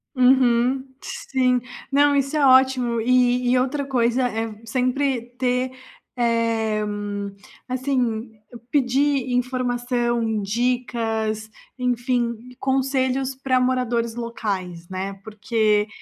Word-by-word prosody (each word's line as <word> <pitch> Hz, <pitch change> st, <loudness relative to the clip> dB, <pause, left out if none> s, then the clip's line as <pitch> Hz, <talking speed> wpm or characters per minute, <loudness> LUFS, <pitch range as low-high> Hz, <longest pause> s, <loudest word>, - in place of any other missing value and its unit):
Uhum, 255 Hz, 0 st, +4 dB, 0.2 s
sim, 255 Hz, -2 st, 0 dB, 0.3 s
não, 285 Hz, +1 st, +4 dB
isso 275 Hz, +2 st, 0 dB
é 295 Hz, -, +2 dB
ótimo 260 Hz, -3 st, +4 dB
e 250 Hz, +1 st, +3 dB
e 255 Hz, -, +4 dB
outra 275 Hz, +2 st, -1 dB
coisa 250 Hz, -1 st, +1 dB
é 225 Hz, -1 st, -3 dB
sempre 255 Hz, +2 st, 0 dB, 0.2 s
ter 255 Hz, 0 st, 0 dB, 0.5 s
eh, 230 Hz, -2 st, +1 dB, 0.9 s
assim, 250 Hz, -3 st, -1 dB, 0.4 s
pedir 275 Hz, -1 st, +2 dB
informação, 245 Hz, -2 st, 0 dB
dicas, 225 Hz, -1 st, -1 dB, 0.3 s
enfim, 245 Hz, -1 st, 0 dB, 0.2 s
conselhos 265 Hz, 0 st, 0 dB
para 260 Hz, -1 st, +1 dB
moradores 245 Hz, -2 st, 0 dB
locais, 195 Hz, -7 st, -4 dB
né, 190 Hz, +1 st, -4 dB
porque 215 Hz, -1 st, +1 dB
245 Hz, 95 wpm, -23 LUFS, 230-260 Hz, 0.9 s, Uhum